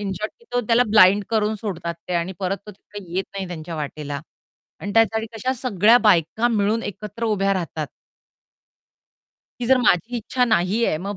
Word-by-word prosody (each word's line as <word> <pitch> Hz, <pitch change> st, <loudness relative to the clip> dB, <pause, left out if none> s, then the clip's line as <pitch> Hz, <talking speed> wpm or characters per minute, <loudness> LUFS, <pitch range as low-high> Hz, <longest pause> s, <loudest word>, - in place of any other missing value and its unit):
In 200 Hz, -2 st, -3 dB
short 215 Hz, +2 st, -4 dB, 0.2 s
तो 245 Hz, -, +2 dB
त्याला 235 Hz, +2 st, +4 dB
blind 205 Hz, -1 st, +6 dB
करून 220 Hz, -1 st, +1 dB
सोडतात 170 Hz, -6 st, -4 dB
ते 180 Hz, -, -2 dB
आणि 170 Hz, +2 st, -1 dB
परत 195 Hz, 0 st, -1 dB
तो 210 Hz, -, -8 dB
काही 195 Hz, -2 st, -11 dB
येत 190 Hz, -, 0 dB
नाही 195 Hz, -1 st, -4 dB
त्यांच्या 165 Hz, -1 st, -7 dB
वाटेला 145 Hz, -1 st, -5 dB, 0.6 s
आणि 200 Hz, 0 st, -5 dB
त्यासाठी 225 Hz, 0 st, +3 dB
कशा 255 Hz, +4 st, -1 dB
सगळ्या 225 Hz, -1 st, +5 dB
बायका 185 Hz, +6 st, +3 dB
मिळून 220 Hz, 0 st, +1 dB
एकत्र 210 Hz, +3 st, -6 dB
उभ्या 195 Hz, -3 st, +1 dB
राहतात. 160 Hz, -4 st, -3 dB, 1.7 s
ती 240 Hz, -, -2 dB
जर 260 Hz, +1 st, +5 dB
माझी 240 Hz, +1 st, +2 dB
इच्छा 250 Hz, +2 st, 0 dB
नाहीये 215 Hz, -3 st, +1 dB
मग 200 Hz, +4 st, -5 dB
205 Hz, 165 wpm, -22 LUFS, 180-225 Hz, 1.7 s, blind